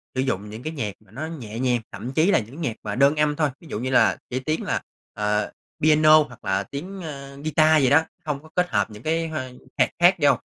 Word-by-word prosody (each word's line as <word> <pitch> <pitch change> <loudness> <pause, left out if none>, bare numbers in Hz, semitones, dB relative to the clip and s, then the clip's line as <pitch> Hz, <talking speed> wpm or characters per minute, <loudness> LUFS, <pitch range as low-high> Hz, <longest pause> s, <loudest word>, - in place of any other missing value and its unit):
sử 130 - +1
dụng 105 -6 -2
những 110 +3 -9
cái 155 +1 -4
nhạc 110 -9 -3
mà 105 -2 -24
nó 140 +7 -5
nhẹ 120 -9 -7
nhàng, 125 -2 +2
thậm 125 +3 -6
chí 165 +8 +3
là - - +4
những 130 +9 -9
nhạc 120 -8 -2
mà 105 -1 -3
đơn 140 +3 +4
âm 150 -1 +2
thôi, 150 -2 +1
ví 165 - -15
dụ 105 - -4
như 130 - -2
là - - +4
chỉ 130 - -2
tiếng 155 +5 -2
là, - - -1 0.3
ờ, 105 0 0 0.3
piano 155 0 +6
hoặc 125 -5 -14
là 95 +1 +1
tiếng, 185 - -7
ơ, 140 -4 -8
ghi-ta 155 0 +4
gì 135 -4 +4
đó, 155 +3 +5 0.2
hông 150 -1 -3
có 155 - -15
kết 180 0 +2
hợp 105 -2 +1
những 105 +2 -11
cái 165 +1 0
h 160 - -7 0.4
hạt - - +4
khác 175 +2 +6
vô. 145 -2 +5
140 Hz, 255 wpm, -24 LUFS, 115-155 Hz, 0.4 s, piano